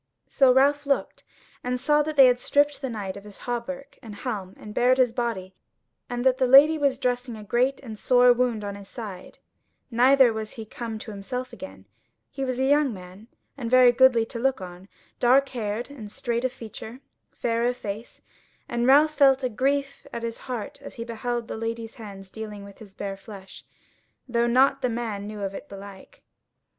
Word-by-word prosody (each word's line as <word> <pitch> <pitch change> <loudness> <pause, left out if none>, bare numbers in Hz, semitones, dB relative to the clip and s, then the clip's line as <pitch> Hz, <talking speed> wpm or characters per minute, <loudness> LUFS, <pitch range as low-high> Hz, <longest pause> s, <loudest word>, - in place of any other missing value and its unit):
So 265 -2 +4
Ralph 285 +2 +3
looked, 275 - -1 0.4
and 250 0 -2
saw 295 +3 +3
that 305 +1 -3
they 270 -2 +9
had 250 -1 +4
stripped 290 +2 +1
the 265 - -3
knight 205 -5 -5
of 200 - -10
his 205 -1 -12
hauberk 265 +3 -5
and 220 -5 -10
helm, 200 -5 -5
and 210 - -10
bared 250 +3 +3
his 250 -3 +3
body, 230 -6 -3 0.6
and 245 +1 -3
that 260 -1 +3
the 260 - +3
Lady 280 +5 +8
was 280 -4 +1
dressing 245 -2 -2
a 215 - -9
great 250 +6 +1
and 220 -5 -9
sore 250 -1 +5
wound 240 -3 0
in 200 0 -4
his 200 -1 -11
side; 200 -6 -8 0.5
neither 255 +1 +5
was 220 -1 -5
he 225 - -8
come 225 0 -6
to 215 +1 -8
himself 250 +5 -5
again: 95 - -10 0.5
he 270 - -4
was 255 -2 -2
a 260 - 0
young 285 0 +3
man, 185 +2 -11 0.3
and 245 -5 -5
very 255 0 +7
goodly 245 -2 +5
to 230 - -7
look 265 +2 +1
on, 180 0 -10 0.3
dark 265 +3 +4
haired 230 +1 -4
and 220 -8 -9
straight 235 +3 -2
of 255 - 0
feature, 230 0 -9 0.3
fair 230 0 -1
of 245 0 -1
face; 210 0 -7 0.4
and 240 +1 -1
Ralph 300 +3 +6
felt 275 -2 +4
a 255 - +1
grief 275 +4 -1
at 235 - -6
his 230 0 -4
heart 250 +3 -5
as 280 - -10
he 230 - -5
beheld 235 0 -3
the - - -5
Lady's 225 0 -4
hands 195 -3 -10
dealing 210 -2 -7
with 200 0 -13
his 205 -4 -14
bare 195 -1 -5
flesh, 195 -1 -12 0.6
though 235 -1 +1
nought 265 +3 +3
the 250 - +1
man 225 -4 -4
knew 210 -1 -7
of 195 -1 -3
it - - -9
belike. 200 - -12
240 Hz, 195 wpm, -25 LUFS, 215-260 Hz, 0.6 s, they